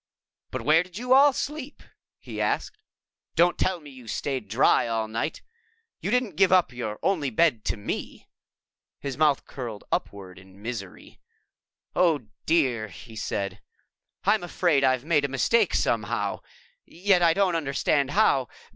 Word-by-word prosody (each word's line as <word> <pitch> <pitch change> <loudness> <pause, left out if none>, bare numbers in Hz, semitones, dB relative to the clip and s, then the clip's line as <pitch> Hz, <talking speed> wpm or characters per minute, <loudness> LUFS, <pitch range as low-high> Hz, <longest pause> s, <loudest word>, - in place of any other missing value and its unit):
"But - - -5
where 155 +2 +5
did 180 +1 -10
you 250 +2 +1
all 280 +2 +7
sleep?" 290 +1 -5 0.3
he - - -6
asked. - - -1 0.6
"Don't 175 +1 +4
tell 185 -2 +1
me 150 -3 -13
you 130 -3 -14
stayed 130 -1 -3
dry 115 +3 +3
all 115 -1 -1
night! 115 +8 -3 0.6
You - - -3
didn't 245 -7 0
give 190 -1 +4
up 180 -7 +4
your 110 -4 -4
only 165 -8 +1
bed 120 -2 +2
to - - -1
me?" 100 - -5 0.7
His 140 -2 -4
mouth 150 -2 +2
curled 120 -6 -7
upward 95 -2 -4
in 95 +1 -17
misery. 105 -3 -8 0.8
"Oh, 170 -5 +2 0.2
dear," 130 -9 +2
he 110 +4 -12
said, 100 -2 -3 0.6
"I'm 205 +2 +3
afraid 170 -5 +1
I've 130 0 +2
made 155 -3 +2
a - - +1
mistake 140 - +2
somehow. - - 0 0.4
Yet 185 +1 +1
I 165 -1 +4
don't 195 -3 +2
understand 140 -2 +1
how. 145 - +3
145 Hz, 150 wpm, -26 LUFS, 115-180 Hz, 0.8 s, all